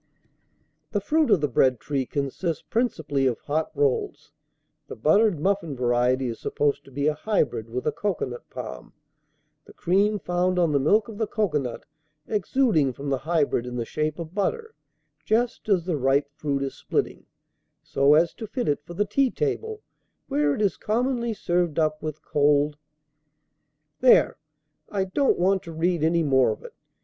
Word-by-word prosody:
"The 205 - +2
fruit 305 +8 +1
of 200 -7 +4
the 150 - +2
bread 130 -1 +2
tree 135 -1 -2
consists 150 +4 -3
principally 155 - 0
of 120 -3 0
hot 155 +2 -1
rolls. 140 -2 -1 0.6
The - - -7
buttered 175 - +3
muffin 190 -4 0
variety 125 +1 +1
is 115 -1 -5
supposed 145 -1 -1
to 135 - -16
be 140 +2 -2
a 155 - +3
hybrid 150 - -1
with 125 +2 -4
a 150 - +2
cocoanut 150 -12 -4
palm, 65 -1 -8 0.7
the - - -15
cream 200 +4 +2
found 180 -1 0
on 170 -3 +3
the 140 - +2
milk 200 +10 +3
of 220 -2 -9
the 220 - 0
cocoanut 150 - -2 0.4
exuding 205 - +1
from 140 +3 -6
the 135 - 0
hybrid 145 -5 0
in 125 - -5
the 120 -1 -2
shape 155 +3 -2
of 165 -1 -7
butter, 445 - -2 0.5
just 235 0 0
as 185 -5 +2
the 175 -4 -1
ripe 140 +2 +1
fruit 140 -2 -2
is 135 - -3
splitting, - - -3 0.6
so 140 +2 +3
as 165 +2 +3
to 220 - -8
fit 245 +3 -3
it 145 0 0
for 175 - -10
the 205 - +1
tea 265 +6 +2
table, 440 - -3 0.4
where 145 -1 +1
it 215 - -1
is 200 - +1
commonly 235 +1 -1
served 175 -6 -1
up 155 -1 +1
with 155 -1 -6
cold 145 0 +2 0.7
" 150 0 -52
There, 255 -1 +5 0.5
I 195 -2 0
don't 265 +9 +1
want 190 +1 +2
to 165 - -9
read 165 0 0
any 165 +1 +2
more 130 -4 +3
of 110 - -4
it. - - -11
155 Hz, 175 wpm, -25 LUFS, 140-205 Hz, 0.7 s, There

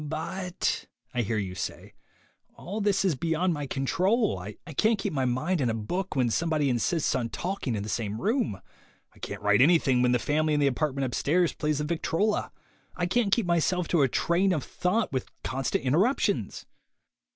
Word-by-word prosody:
"But," 170 +4 -3 0.3
I 125 - +1
hear 110 0 -1
you 95 -3 -3
say, 90 - -6 0.6
"all 205 +5 -5
this 200 -1 +2
is 185 - +3
beyond 165 +5 0
my 145 -2 -4
control. 185 - +1
I 100 +4 -7 0.2
can't 220 +5 +3
keep 195 -2 -3
my 135 -3 0
mind 150 +8 0
on 125 - +1
a 115 - 0
book 175 - -3
when 125 -4 +2
somebody 155 -1 +1
insists 145 +7 +1
on 120 -3 -1
talking 175 - -3
in 100 - -3
the - - -6
same 105 +1 -2
room. 220 - 0 0.5
I - - -20
can't - - -6
write 105 +2 +4
any 165 +6 +7
thing 130 -5 +1
when 125 0 +3
the 125 - +4
family 150 +4 +1
in - - +2
the 145 - +3
apartment 140 0 0
upstairs 160 +7 +1
plays 150 -1 -1
the 150 - -1
victrola. 170 +6 0 0.4
I 175 - -1
can't 200 +3 +1
keep 230 -1 +3
myself 175 0 +1
to 170 - +3
a 135 - +5
train 180 +8 +1
of 155 - -1
thought 185 +3 -1
with 130 -3 -3
constant 135 0 -1
interruptions!" 185 - +1
155 Hz, 190 wpm, -27 LUFS, 125-180 Hz, 0.6 s, any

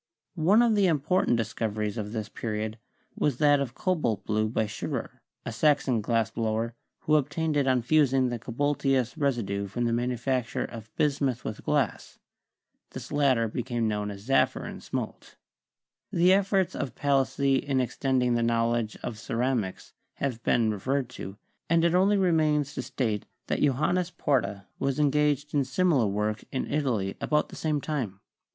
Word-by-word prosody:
One 205 +9 +5
of 235 -2 +3
the 200 -2 +4
important 160 -3 +2
discoveries 110 -2 -2
of 105 -2 -4
this 110 -2 -3
pe 115 - -7
riod 110 0 -2 0.4
was 145 -5 0
that 145 -1 +4
of 130 -3 -3
cobalt 155 - -1
blue 110 0 +1
by 110 0 0
Schiirer, 105 - -5 0.3
a - - -3
Saxon 130 -1 +2
glass 115 0 0
blower, 115 +1 -1 0.3
who 155 - 0
obtained 150 +2 -1
it 140 -2 +2
on 130 -2 +2
fusing 135 -2 +3
the 120 -1 -3
cobalteous 135 0 0
residue 115 -9 -1
from 120 +5 -2
the 115 - +1
manufacture 125 +1 -1
of 110 -2 -9
bismuth 140 -4 0
with 110 - -5
glass; 145 -6 -1 0.8
this - - -8
latter 135 -6 +3
became 120 0 -2
known 105 -1 -1
as 100 +2 -9
zaffre 135 - +2
and - - -8
smalt. - - -5 0.8
The 180 +2 +5
efforts 190 -2 +2
of 130 -5 -4
Palissy 140 -1 +2
in 135 -2 0
extending 125 0 +1
the 120 - +1
knowledge 115 -1 0
of 110 -3 -5
ceramics 115 -4 -2 0.2
have 125 -5 -3
been 115 -2 +2
referred 130 +5 -1
to, 95 -5 -8 0.3
and 165 0 +4
it 170 - +3
only 195 +3 +4
remains 155 -6 +2
to - - -3
state 110 -5 -2 0.2
that - - -1
Johannes 155 +6 +2
Porta 120 - -1
was 135 +1 -1
engaged 150 0 +2
in 145 -2 +3
similar 135 - +2
work 105 +2 -1
in 130 - -2
Italy 120 -10 0
about 150 0 +1
the - - -10
same 155 -2 0
time. 130 -11 -3
130 Hz, 160 wpm, -27 LUFS, 115-150 Hz, 0.8 s, One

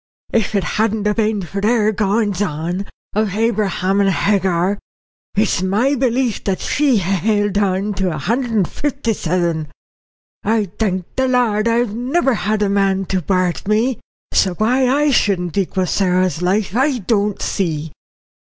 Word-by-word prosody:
If 220 -2 +1
it 195 - +2
hadn't 220 -1 0
been 215 -3 0
for 195 +4 -5
their 215 0 +2
goings 205 -1 0
on, 175 +2 -2 0.3
of 210 -2 0
Abraham 200 -3 +1
and 195 - +3
Hagar, 190 +2 +1 0.6
it's 210 -2 +1
my 210 +9 +1
belief 250 -3 0
that 195 -2 0
she'd 275 -8 +1
ha' 190 +1 0
held 205 -1 +1
on 200 +1 0
to 190 -1 +1
a 155 - -4
hundred 235 - -1
and 210 -6 +1
fifty 275 -5 -2
seven. 170 -4 -1 0.8
I 210 -3 0
thank 190 -5 0
the 260 0 +1
Lord 235 -4 +2
I've 230 -2 +1
never 265 +5 +1
had 215 -1 -1
no 205 - +2
man 195 -1 +1
to 185 -2 0
worrit 185 -1 0
me. 220 +3 +1 0.3
So 185 -2 +2
why 250 +5 +2
I 290 +2 +2
shouldn't 180 - +1
equal 190 -1 0
Sarah's 185 -2 +1
life 195 +2 0
I 265 +1 +2
don't 205 -1 0
see." 160 -5 -2
205 Hz, 155 wpm, -18 LUFS, 185-225 Hz, 0.8 s, and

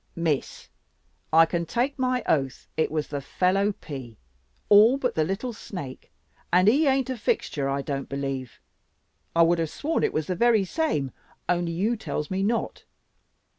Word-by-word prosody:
"Miss, 160 -5 -2 0.6
I 165 +1 +7
can 170 0 -2
take 260 - -1
my 255 -1 +1
oath 135 -3 0
it 160 - +1
was 155 -1 -2
the 145 -1 -3
fellow 190 +7 +1
pea, 130 - -9 0.5
all 215 +6 +7
but 255 -3 -1
the 155 - +1
little 195 +9 -3
snake, 145 -11 -8 0.4
and 180 +2 +4
he 285 +8 +5
ain't 265 -1 +2
a - - -2
fixture, 145 - -1
I 140 0 -1
don't 135 -1 -4
believe. 135 -2 -4 0.8
I 170 - +6
would 170 +1 +3
have 165 -2 -1
sworn 315 - -1
it - - +2
was 155 - -1
the 185 - -2
very 225 -1 +3
same, 180 - -1 0.4
only 175 -1 0
you 210 +8 +1
tells 170 -8 -4
me 190 +1 0
not. 225 +4 -1
175 Hz, 170 wpm, -26 LUFS, 145-230 Hz, 0.8 s, I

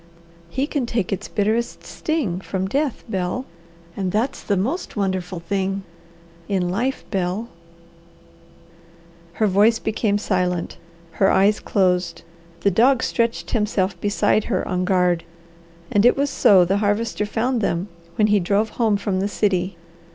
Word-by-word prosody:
He 265 +9 -1
can 285 -5 -2
take 225 -6 -1
its 185 - -4
bitterest 215 +7 -1
sting 250 - -2
from 190 0 -3
death, 280 +4 -1
Bel 190 +5 -2 0.5
and 190 -2 -2
that's 240 +7 -1
the 200 - 0
most 260 - -2
wonderful 185 -3 -2
thing 195 +1 -2 0.7
in 185 -3 0
life, 245 +9 -1
Bel 195 +3 -2 0.9
" 170 0 -27
Her 215 - +1
voice 210 +3 +4
became 215 -2 0
silent, 180 -4 -1 0.4
her 195 - +6
eyes 205 +2 +4
closed; 180 -3 0 0.4
the 200 - +3
dog 240 +6 +4
stretched 230 -1 -1
himself 200 -5 0
beside 205 +1 +2
her 190 -6 -1
on 180 0 -1
guard, 180 -3 +2 0.7
and 205 - +3
it 245 - +5
was 280 0 +1
so 185 -3 +5
the 195 +3 +1
Harvester 210 +1 0
found 240 +3 0
them 180 -1 -1 0.3
when 210 - +3
he 210 -1 +4
drove 200 +4 +1
home 215 -3 +3
from 200 -1 -1
the 195 - 0
city. 190 -3 0
200 Hz, 145 wpm, -22 LUFS, 180-220 Hz, 0.9 s, her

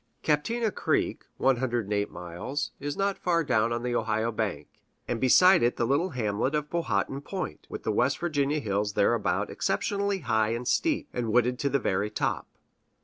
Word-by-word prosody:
Captina 215 +9 +1
Creek - - -1
(108 120 -6 +1
miles) 90 +12 -5
is 145 +1 -4
not 200 0 0
far 170 -2 +1
down 115 -5 +1
on 120 0 -2
the 125 -1 -1
Ohio 110 0 0
bank, 110 -2 -3 0.4
and 115 - -2
beside 180 +8 +6
it 120 +1 +2
the 120 - +1
little 145 +9 +1
hamlet 120 - -1
of 150 0 -2
Powhattan 135 -5 -1
Point, 185 +5 -6
with - - -7
the 110 - 0
West 130 +6 +2
Virginia 150 -3 0
hills 105 -4 -1
thereabout 105 +2 +1
exceptionally 200 -1 -1
high 110 -4 +1
and 120 +1 -5
steep, 315 - +1
and 120 -3 -2
wooded 125 +2 +2
to 140 - 0
the 140 - +2
very 100 -5 0
top. 105 - -2
125 Hz, 170 wpm, -27 LUFS, 110-150 Hz, 0.4 s, beside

